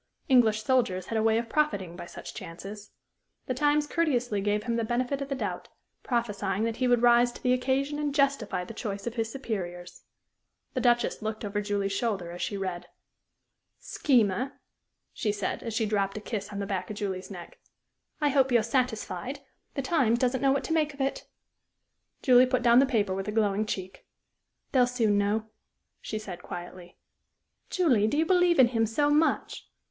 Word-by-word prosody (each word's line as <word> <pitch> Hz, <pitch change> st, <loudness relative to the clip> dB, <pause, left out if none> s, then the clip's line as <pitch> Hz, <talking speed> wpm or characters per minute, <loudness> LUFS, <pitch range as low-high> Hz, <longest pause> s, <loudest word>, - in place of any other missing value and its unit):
English 225 Hz, -5 st, +4 dB
soldiers 215 Hz, -9 st, +1 dB
had 225 Hz, -, -2 dB
a -, -, +2 dB
way 220 Hz, 0 st, +3 dB
of 230 Hz, 0 st, -2 dB
profiting 205 Hz, -, 0 dB
by 175 Hz, -, -8 dB
such -, -, -9 dB
chances. 200 Hz, +5 st, -9 dB, 0.6 s
The 255 Hz, -, -1 dB
Times 295 Hz, +3 st, +2 dB
courteously 250 Hz, -, 0 dB
gave 205 Hz, +1 st, 0 dB
him 235 Hz, 0 st, -1 dB
the 230 Hz, -, 0 dB
benefit 250 Hz, +4 st, -1 dB
of 275 Hz, -, -4 dB
the 275 Hz, -, -1 dB
doubt, -, -, -4 dB, 0.3 s
prophesying 210 Hz, -4 st, -1 dB
that 230 Hz, 0 st, -1 dB
he 255 Hz, -, +1 dB
would 245 Hz, -1 st, +3 dB
rise 240 Hz, 0 st, +5 dB
to -, -, -13 dB
the 250 Hz, -, +3 dB
occasion 270 Hz, +3 st, 0 dB
and 290 Hz, -1 st, -2 dB
justify 275 Hz, -10 st, +1 dB
the 225 Hz, -, -9 dB
choice 205 Hz, -3 st, -5 dB
of 235 Hz, -, -3 dB
his 225 Hz, -1 st, -2 dB
superiors. 180 Hz, -9 st, -5 dB, 0.7 s
The -, -, -1 dB
Duchess 240 Hz, -2 st, +2 dB
looked 215 Hz, 0 st, -4 dB
over 205 Hz, 0 st, -2 dB
Julie's 200 Hz, -1 st, -1 dB
shoulder 195 Hz, -4 st, -2 dB
as 175 Hz, -, -7 dB
she 200 Hz, -, -2 dB
read. 180 Hz, -2 st, -4 dB, 0.9 s
"Schemer," 245 Hz, -1 st, +1 dB, 0.5 s
she 210 Hz, -, -1 dB
said, 205 Hz, -2 st, -3 dB
as 230 Hz, -2 st, -5 dB
she 225 Hz, -, +1 dB
dropped 200 Hz, -1 st, 0 dB
a -, -, -2 dB
kiss 210 Hz, -1 st, -5 dB
on 205 Hz, -, -6 dB
the 200 Hz, -, -2 dB
back 185 Hz, -2 st, -3 dB
of 210 Hz, -, -5 dB
Julie's 190 Hz, -2 st, -4 dB
neck, 175 Hz, -4 st, -10 dB, 0.6 s
"I 295 Hz, -2 st, +2 dB
hope 265 Hz, -2 st, +3 dB
you're 235 Hz, -2 st, +4 dB
satisfied. 250 Hz, +2 st, -2 dB, 0.3 s
The 275 Hz, -, -2 dB
Times 260 Hz, -6 st, +2 dB
doesn't 255 Hz, +1 st, 0 dB
know 275 Hz, -1 st, +4 dB
what 275 Hz, -, +1 dB
to 320 Hz, -, -2 dB
make 305 Hz, -3 st, +1 dB
of 280 Hz, -, -6 dB
it." 270 Hz, 0 st, -2 dB, 1.0 s
Julie 255 Hz, -1 st, +6 dB
put 255 Hz, -1 st, 0 dB
down 240 Hz, 0 st, +6 dB
the 275 Hz, -, +4 dB
paper 210 Hz, -6 st, +1 dB
with 195 Hz, +1 st, -4 dB
a -, -, -1 dB
glowing 210 Hz, -1 st, +1 dB
cheek. 190 Hz, -2 st, -6 dB, 0.6 s
"They'll 250 Hz, -2 st, +4 dB
soon 225 Hz, -5 st, +2 dB
know," 210 Hz, +2 st, 0 dB, 0.6 s
she 215 Hz, -, -4 dB
said, 190 Hz, -5 st, -7 dB
quietly. 175 Hz, 0 st, -9 dB, 0.7 s
"Julie, 255 Hz, -, +3 dB
do 255 Hz, -, 0 dB
you 320 Hz, -, +3 dB
believe 355 Hz, 0 st, +4 dB
in 255 Hz, -3 st, +7 dB
him 225 Hz, -2 st, +1 dB
so 290 Hz, +7 st, +1 dB
much?" 310 Hz, +2 st, +1 dB
225 Hz, 190 wpm, -28 LUFS, 200-260 Hz, 1.0 s, in